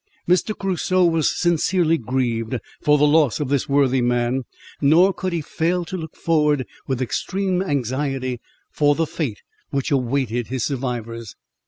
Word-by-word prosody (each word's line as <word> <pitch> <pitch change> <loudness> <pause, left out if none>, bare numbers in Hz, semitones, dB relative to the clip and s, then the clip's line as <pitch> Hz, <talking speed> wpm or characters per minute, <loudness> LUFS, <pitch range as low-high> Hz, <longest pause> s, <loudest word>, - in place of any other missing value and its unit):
Mr. 185 +4 +2
Crusoe 185 -1 +1
was 165 -3 +2
sincerely 170 -1 +2
grieved 120 -1 -1 0.2
for 150 0 +4
the 150 - +4
loss 145 -7 +3
of 145 -3 -2
this 140 -1 0
worthy 135 -2 +3
man, 120 +1 0 0.4
nor 170 +7 +5
could 185 +1 -3
he 170 -2 -1
fail 170 +4 -1
to 185 - -6
look 160 -3 -6
forward 150 -5 +1 0.2
with 130 -1 -1
extreme 185 +7 -1
anxiety 135 - -2 0.3
for 145 -1 +3
the 165 - +1
fate 140 -9 -4 0.3
which 140 0 -2
awaited 125 -3 0
his 130 -2 -2
survivors. 120 -5 -4
145 Hz, 150 wpm, -22 LUFS, 125-165 Hz, 0.4 s, nor